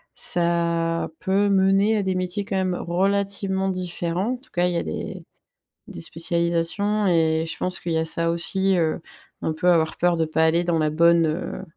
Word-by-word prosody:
ça 170 -1 +1
peut 200 +2 +1
mener 195 +2 +3
à 205 - 0
des 190 -1 -1
métiers 185 +2 -2
quand 200 -3 -4
même 185 -1 0
relativement 195 +2 -1
différents. 180 +3 -2
En - - -5
tout 255 - -19
cas, 180 0 +2
il 175 - -1
y - - -1
a - - -1
des 80 - -6 0.6
des - - -9
spécialisations 170 - -1
et 160 -2 +2
je - - -4
pense 180 0 -1
qu'il 170 - -4
y - - +1
a 160 - 0
ça 165 +1 0
aussi, 190 +2 +1
heu, 160 0 0 0.4
on 160 - -1
peut 165 +3 -2
avoir 160 -2 +1
peur 175 0 +2
de 160 - +1
pas 160 +1 +1
aller 170 +2 +2
dans 170 -2 0
la 155 0 +1
bonne, 170 +1 +4
heu, 155 +4 -4
175 Hz, 200 wpm, -23 LUFS, 165-190 Hz, 0.6 s, bonne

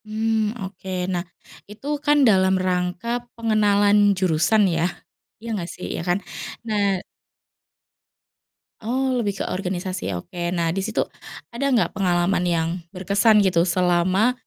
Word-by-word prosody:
Mmm, 220 +1 -1
oke, 190 0 -10 0.2
nah 175 - 0 0.5
itu 210 +5 -13 0.2
kan 295 0 +4
dalam 190 -2 +4
rangka 180 +2 -1 0.3
pengenalan 210 -2 +3 0.2
jurusan 185 +4 +3
ya, 165 - +1 0.6
iya 230 - -8
gak 170 - -5
sih? 180 - -9
Iya - - -3
kan, 175 +2 +2 0.5
nah 200 -3 +1 1.8
Oh, 260 +4 0
lebih 210 -6 -1
ke - - -3
organisasi, 185 - -3
oke. 175 - -8 0.2
Nah, 165 -1 0
disitu 195 +4 -1 0.5
ada 275 +4 -1
gak 245 -4 +2
pengalaman 180 -1 +1
yang 170 -2 0 0.2
berkesan 200 +4 +3
gitu 180 -3 +3
selama 185 +5 +2
195 Hz, 125 wpm, -23 LUFS, 180-215 Hz, 1.8 s, kan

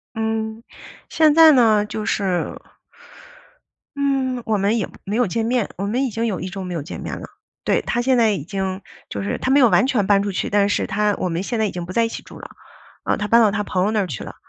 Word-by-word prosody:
嗯， 220 0 -2 0.5
现 310 -2 +4
在 320 0 +8
呢 220 -6 +4
就 210 0 -5
是 190 -5 -1 1.4
嗯， 270 -3 0
我 220 -1 +1
们 200 +3 +1
也 215 - -1 0.2
没 200 +2 -3
有 245 -2 +2
见 225 +4 -1
面。 240 -2 0
我 195 - -3
们 240 +6 0
已 260 - -1
经 225 +2 -2
有 205 -6 -2
1 185 - -5
周 195 +1 -6
没 180 -1 -5
有 165 - -3
见 145 - -8
面 - - -5
了， - - -9 0.4
对， - - +1
他 240 - -1
现 260 +1 +2
在 225 -2 +4
已 190 -9 -3
经 190 +2 -4 0.3
就 100 - -4
是 100 - -2
他 260 - -1
没 285 - +5
有 250 - +6
完 180 +5 +4
全 220 -7 0
搬 200 -1 +4
出 205 - -2
去 185 - -2
但 200 -1 +2
是 - - 0
他 210 0 +1
我 - - -1
们 170 +2 -2
现 230 +2 -3
在 220 - +2
已 205 - -2
经 175 -1 -5
不 185 - -8
在 230 +4 +2
一 225 - -3
起 - - -7
住 - - -13
了， - - -9 0.6
呃， - - 0
他 210 - -3
搬 230 +2 +5
到 215 -3 +4
他 210 0 -1
朋 185 -2 -1
友 210 - +1
那 220 - +1
儿 195 - 0
去 135 -10 -6
了， - - -9
210 Hz, 280 characters per minute, -21 LUFS, 195-235 Hz, 1.4 s, 在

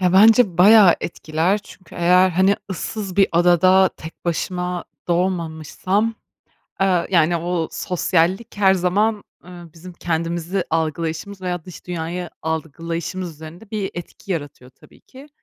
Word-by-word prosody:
Ya, 180 -1 +2
bence 210 -2 +5
bayağı 200 -1 +7
etkiler 165 +4 -1
çünkü 195 -2 -16
eğer, 180 +2 +4
hani, 190 +3 +3
ıssız 190 +2 -5
bir 195 -1 +5
adada 180 +2 +5
tek 160 +1 -11
başıma 180 +1 -2 0.2
doğmamışsam, 180 +4 -1 0.7
eee, 185 -3 +2
yani, 170 -2 +3
o 170 -1 -2
sosyallik 180 +4 0
her 195 -2 +4
zaman, 200 +4 0 0.2
ııı, 175 -2 -12
bizim 175 +3 -12
kendimizi 170 +2 -2
algılayışımız, 165 +4 -2
veya 180 -3 -4
dış 180 - -12
dünyayı 175 0 -4
algılayışımız 165 +3 -4
üzerinde 160 +7 -12
bir 210 -3 -3
etki 175 +3 -7
yaratıyor 145 -6 -6
tabii - - -21
ki. 270 +3 -15
180 Hz, 130 wpm, -21 LUFS, 165-190 Hz, 0.7 s, bayağı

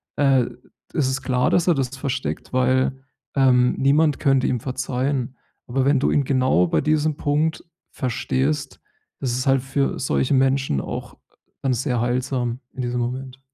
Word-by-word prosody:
Äh, 135 -3 +3 0.5
es 140 - +2
ist 130 +1 -1
klar, 125 -1 +1
dass 175 0 +2
er 175 - +4
das 135 -1 -2
versteckt, 135 -1 -4
weil 130 +1 +1 0.3
ähm, 125 -2 +4
niemand 145 +2 +3
könnte 135 -2 +2
ihm 125 - 0
verzeihen. 130 0 -2 0.3
Aber 130 +2 0
wenn 140 -1 +3
du - - +1
ihn 145 - +2
genau 130 -9 +3
bei - - +1
diesem 155 0 +1
Punkt 155 +2 0 0.3
verstehst, 135 +3 -2 0.4
ist 125 -3 -1
es 130 - -2
halt 135 -1 +4
für 135 +1 -1
solche 130 +1 0
Menschen 135 - +2
auch - - -7 0.4
dann 135 -2 +1
sehr 125 -1 -1
heilsam 125 0 -1
in 130 - -5
diesem 125 0 -2
Moment. 130 +2 -4
130 Hz, 160 wpm, -22 LUFS, 125-140 Hz, 0.5 s, er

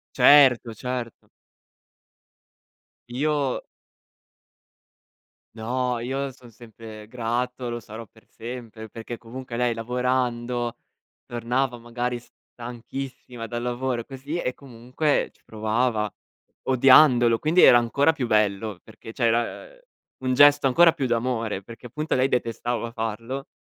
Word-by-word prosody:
Certo, 130 -5 +6
certo. 125 0 -6 1.8
Io 145 +2 -1 1.9
No, 125 +2 -2
io 135 +3 -3
son 125 -3 -16
sempre 110 -2 -12
grato, 125 +1 -3
lo 120 0 -4
sarò 110 +1 -10
per 110 +2 -23
sempre, 115 -2 -8
perché 115 +1 -8
comunque 120 +1 -8
lei 120 -1 +1
lavorando, 120 0 -1 0.5
tornava 120 +2 -1
magari 120 +1 -4
stanchissima 120 0 -9
dal 120 +1 -4
lavoro 125 -1 -2
così 140 +5 -6
e 125 - -2
comunque 130 +3 -2
ci - - -32
provava 110 0 0 0.6
odiandolo, 130 -3 +6
quindi 165 +4 +3
era 120 - +9
ancora 140 +7 +2
più 130 -6 -3
bello 105 -2 +1
perché 110 - -12
cioè 120 - -2
era, 120 - 0
uhm, - - -21 0.5
un 130 - +2
gesto 145 0 +6
ancora 165 +6 +6
più 140 -6 -2
d'amore, 115 -4 -1
perché 115 +3 -11
appunto 150 +6 -3
lei 130 +1 +2
detestava 120 -1 -2
farlo, 115 +4 -4
120 Hz, 115 wpm, -24 LUFS, 115-130 Hz, 1.9 s, era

